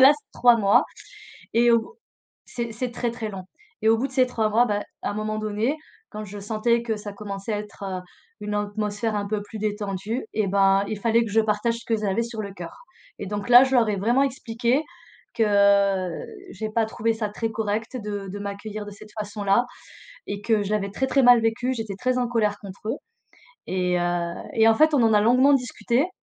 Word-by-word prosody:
là, 270 +2 +9
c'est - - -33
3 240 -1 +6
mois 200 -2 +4 0.7
et 235 +1 +5
au 230 - 0 0.5
c'est 235 -2 -5
c'est 245 +2 -3
très, 240 0 -2
très 230 -2 -5
long 190 -2 -7 0.4
et 220 - +1
au 225 - +5
bout 260 +4 -1
de - - -17
ces 260 -1 +4
3 225 -3 0
mois, 230 +3 +4
bah, 205 -3 -1 0.2
à - - -2
un - - -5
moment 215 +1 -3
donné, 215 +7 -1 0.3
quand 215 - -7
je 205 +1 -8
sentais 225 +3 0
que 225 -2 -1
ça 210 0 -7
commençait 200 +1 -5
à 205 - -1
être, 210 -1 -10
heu, 190 -2 -4 0.4
une 210 0 -4
atmosphère 210 +1 -2
un 205 -1 -2
peu 210 0 -2
plus 215 +1 -9
détendue, 210 +2 -3
eh 215 -2 0
ben, 195 0 +3
il 215 - -3
fallait 230 +2 +3
que 215 - -6
je 225 +2 +4
partage 215 +2 0
ce 235 - -15
que 225 - +1
j'avais 210 0 0
sur 230 -1 -5
le 200 -2 -7
cœur. 175 -3 -8 0.5
Et - - -4
donc, 205 +2 -4
là, 245 +1 +10
je 265 0 0
leur 230 -3 +4
ai 205 - 0
vraiment 240 +8 +2
expliqué 245 0 0 0.5
que 200 -3 +3 0.4
j'ai 220 0 -5
pas 225 +1 +1
trouvé 225 +1 -1
ça 220 -1 -2
très 225 +2 -3
correct 220 +3 -2
de 205 -1 -4
de 200 +2 -6
m'accueillir 205 +1 -6
de 205 - -8
cette 210 +1 -13
façon-là 205 +2 +1 0.6
et 200 0 -4
que 215 -1 +1
je 200 - -4
l'avais 200 -2 0
très, 265 +6 -1
très 270 0 +3
mal 245 -1 +8
vécu, 225 +3 0
j'étais 220 -5 -5
très 255 +5 0
en 250 -1 +1
colère 215 -4 0
contre 200 +2 -8
eux 235 - 0 0.7
et 180 -1 0
heu 175 -1 -1 0.2
et 225 0 +4
en 225 - +5
fait, 310 +4 +4
on 275 - +4
en 225 -1 +4
a 210 - +5
longuement 255 +5 +5
discuté 250 +3 0
215 Hz, 220 wpm, -24 LUFS, 205-235 Hz, 0.7 s, là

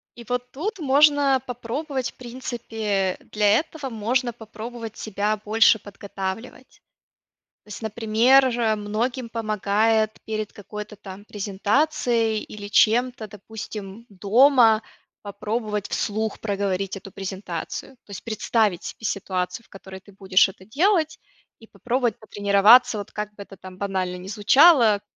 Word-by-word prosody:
И 240 - -11
вот 250 0 -3
тут 390 - -4
можно, 285 -2 +4
попробовать 255 +2 -4
в - - -34
принципе, 225 -6 -3
э, - - -22
для 210 -1 +2
этого 310 -3 -6
можно 240 +2 -1
попробовать 225 0 -9
себя 210 0 -1
больше 220 +1 +4
подготавливать. 200 +5 -7 0.8
То - - -32
есть 210 - -8
например, 230 +4 +3
же 230 -2 +1
многим 230 +4 -3
помогает, 215 0 +1
перед 215 -1 -4
какой-то 210 +1 -8
там 195 0 -11
презентацией 220 +2 0
или 205 -1 -9
чем-то, 230 +2 +2
допустим 210 0 -9
дома 225 +3 +4 0.4
попробовать 210 0 -3
вслух 215 +1 -2
проговорить 195 -2 -2
эту 195 0 -11
презентацию. 190 +5 -6
То - - -15
есть 200 - -8
представить 215 -4 0
себе 220 - -8
ситуацию, 185 +1 -3
в - - -29
которой 190 -1 -11
ты 200 +1 -19
будешь 190 -1 +3
это 190 - -14
делать, 315 - +1 0.4
и 225 - -16
попробовать 245 -1 -2
потренироваться, 215 +3 +5
вот 205 - -8
как 210 0 -5
бы 210 - -12
это 195 -1 -15
там 185 0 -12
банально 185 -2 -2
не 180 +1 -10
звучало, 225 - +5
215 Hz, 135 wpm, -23 LUFS, 200-245 Hz, 0.8 s, потренироваться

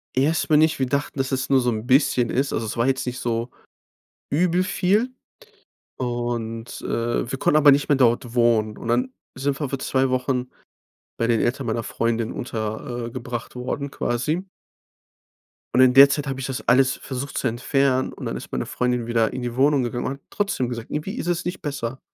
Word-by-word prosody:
Erstmal 150 +3 +3
nicht. 160 +1 +4
Wir 130 - +1
dachten, 140 +2 -2
dass 135 +1 -1
es 130 -1 -1
nur 135 -2 +4
so 125 - +1
'n 110 +1 -3
bisschen 130 -3 +3
ist. 135 +2 0
Also, 115 - -2
es 105 - -4
war 120 +1 +1
jetzt 130 -1 0
nicht 125 0 -4
so 115 0 -2 0.8
übel 175 +4 +2
viel. 205 +7 +1 0.8
Und, 120 -2 -3
äh, 120 +1 -1
wir 135 - -3
konnten 150 - +3
aber 150 -1 +7
nicht 140 +1 +3
mehr 145 - +4
dort 120 -2 +2
wohnen. 115 -3 +2
Und 115 - -8
dann 125 +2 +1 0.2
sind 135 +1 -1
wir 145 -4 -2
für 135 - -2
2 130 0 +1
Wochen 130 0 -1 0.7
bei 115 - 0
den 115 -1 +2
Eltern 125 +1 -1
meiner 115 +1 -1
Freundin 115 0 -1
unter 115 +1 -4
äh, - - -6
gebracht 120 0 -6
worden, 135 +3 -3
quasi. 155 +11 -2 1.3
Und 125 - +3
in 130 -1 +6
der 140 +1 +9
Zeit 145 +1 -1
habe 135 -1 -3
ich 135 - -3
das 130 - -5
alles 130 +1 +4
versucht 135 +1 -5
zu 130 - 0
entfernen. 130 +2 +1
Und - - -9
dann - - -3
ist - - -8
meine 65 - -2
Freundin 125 -1 -1
wieder 115 -2 +2
in 130 - -5
die 120 -1 -4
Wohnung 140 0 +3
gegangen 120 0 -3
und 130 - -1
hat - - -19
trotzdem 200 -12 -1
gesagt 115 -2 -6
irgendwie 190 +10 -3
ist - - -4
es 175 -1 -1
nicht 180 - -4
besser. 135 -3 -4
130 Hz, 205 wpm, -23 LUFS, 120-140 Hz, 1.3 s, der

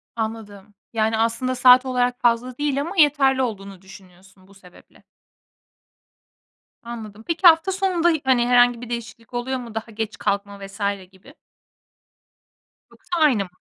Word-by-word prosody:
Anladım. 215 -3 -6 0.2
Yani, 220 0 0
aslında 230 +3 -1
saat 255 +1 +6
olarak 250 -1 -1
fazla 240 +1 0
değil 285 -1 -1
ama 340 +6 -6
yeterli 275 -3 +3
olduğunu 195 -5 -5
düşünüyorsun 190 0 -18
bu 200 - -19
sebeple. 180 -2 -20 1.8
Anladım. 220 -2 -9
Peki, 340 +2 +3
hafta 330 +3 +5
sonunda 370 -3 +1
hi 315 -3 0
hani, 245 -2 +2
herhangi 245 -1 +3
bir 245 - -9
değişiklik 230 0 -8
oluyor 255 +2 -3
mu? 230 -3 -10
Daha 225 +1 -6
geç 220 0 -5
kalkma 200 0 -3
vs. 195 - -15 0.3
gibi. 200 +10 -19 1.6
Yoksa 350 - -6
aynı 260 -10 +3
mı? 180 - -13
235 Hz, 140 wpm, -22 LUFS, 205-265 Hz, 1.8 s, saat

